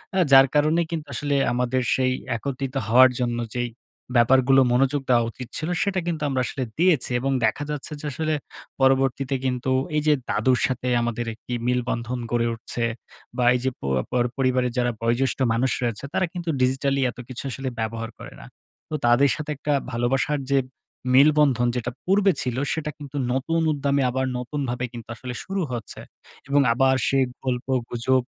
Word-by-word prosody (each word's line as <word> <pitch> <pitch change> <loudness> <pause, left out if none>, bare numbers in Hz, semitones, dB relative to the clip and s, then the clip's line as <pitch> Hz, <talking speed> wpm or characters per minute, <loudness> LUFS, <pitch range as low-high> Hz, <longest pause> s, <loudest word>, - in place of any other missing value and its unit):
আ - - +3
যার 135 0 +8
কারণে 155 +3 +3
কিন্তু 160 -3 -4
আসলে 145 -1 -1 0.2
আমাদের 125 +1 0
সেই 130 -1 +1 0.2
একত্রিত 135 +2 -4
হওয়ার 130 +3 +7
জন্য 120 -1 -1 0.2
যেই 120 0 -1 0.5
ব্যাপারগুলো 130 +2 +5
মনোযোগ 135 +3 +2
দেওয়া 120 -2 +4
উচিত 125 +1 -9
ছিল, 155 - -3
সেটা 195 -2 0
কিন্তু 160 -3 -2
আমরা 130 -2 0
আসলে 130 - -3
দিয়েছি 160 -8 +3
এবং 135 +2 -1
দেখা 110 +6 0
যাচ্ছে 150 +1 -4
যে 150 - -8
আসলে 155 +3 -1 0.5
পরবর্তীতে 135 0 +2
কিন্তু 130 0 -1 0.3
এইযে 150 0 +3 0.2
দাদুর 125 +4 +2
সাথে 125 0 -3
আমাদের 120 0 -2
একটি 115 +2 -8
মিলবন্ধন 125 0 -1
গড়ে 120 -1 +1
উঠছে 115 +1 -4 0.5
বা, 125 - +2
এইযে 125 +1 0
প - - -62 0.3
পর 125 -1 +2
পরিবারের 130 -2 +1
যারা 120 -1 +2
বয়োজ্যেষ্ঠ 120 +3 +1 0.2
মানুষ 125 +3 +1
রয়েছে, 115 -1 -2
তারা 185 - +2
কিন্তু 175 -2 -4
ডিজিটালি 135 +2 +1
এত - - -16
কিছু 130 -1 -6
আসলে 135 +1 -4
ব্যবহার 115 +1 -3
করে - - -10
না। - - -11 0.4
তো 155 - -3
তাদের 120 +4 +5
সাথে 150 -1 -6
একটা 145 +1 -1 0.2
ভালোবাসার 130 +5 0
যে 140 - +4 0.6
মিল-বন্ধন, 140 -3 +5
যেটা 120 0 -2
পূর্বে 195 +1 +4
ছিল, 125 -1 -2 0.2
সেটা 155 -2 -3
কিন্তু 145 -1 -8 0.2
নতুন 165 +6 0
উদ্যামে 140 -1 0
আবার 130 +1 -1
নতুনভাবে 125 -1 -3
কিন্তু 115 -2 -9
আসলে 125 +2 -7
শুরু 195 0 -3
হচ্ছে 120 -3 -6 0.5
এবং 140 0 +4
আবার 130 +2 +3
সেই 135 -1 +3 0.2
গল্পগুজব 125 0 0
130 Hz, 165 wpm, -24 LUFS, 120-140 Hz, 0.6 s, যার